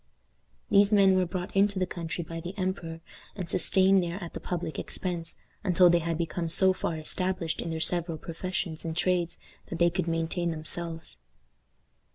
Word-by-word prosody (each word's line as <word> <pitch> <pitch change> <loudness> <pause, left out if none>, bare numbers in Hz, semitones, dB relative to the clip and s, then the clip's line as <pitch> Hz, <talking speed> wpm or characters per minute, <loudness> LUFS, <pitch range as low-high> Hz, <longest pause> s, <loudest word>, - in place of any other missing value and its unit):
These 200 0 +6
men 195 -2 +6
were 185 -1 +2
brought 180 +2 -5
into 200 0 +3
the 185 - +2
country 170 -1 -4
by 165 +1 -6
the 175 +4 -7
emperor, 175 -4 -3 0.3
and 185 -4 -4
sustained 190 +2 +4
there 175 +1 -3
at 170 - -7
the - - -5
public 175 -3 -3
expense, 175 -3 -3 0.3
until 180 -2 +5
they 175 - +4
had 165 -1 -2
become 170 0 -2
so 190 +3 +5
far 170 -3 -2
established 180 +1 -2
in 170 - -4
their 160 0 -3
several 170 0 +1
professions 165 0 -4
and 160 0 -4
trades 175 -1 +1 0.3
that 170 - -5
they 170 0 +4
could 180 0 -1
maintain 165 +1 -1
themselves. 165 +1 -4
175 Hz, 175 wpm, -28 LUFS, 165-185 Hz, 0.3 s, These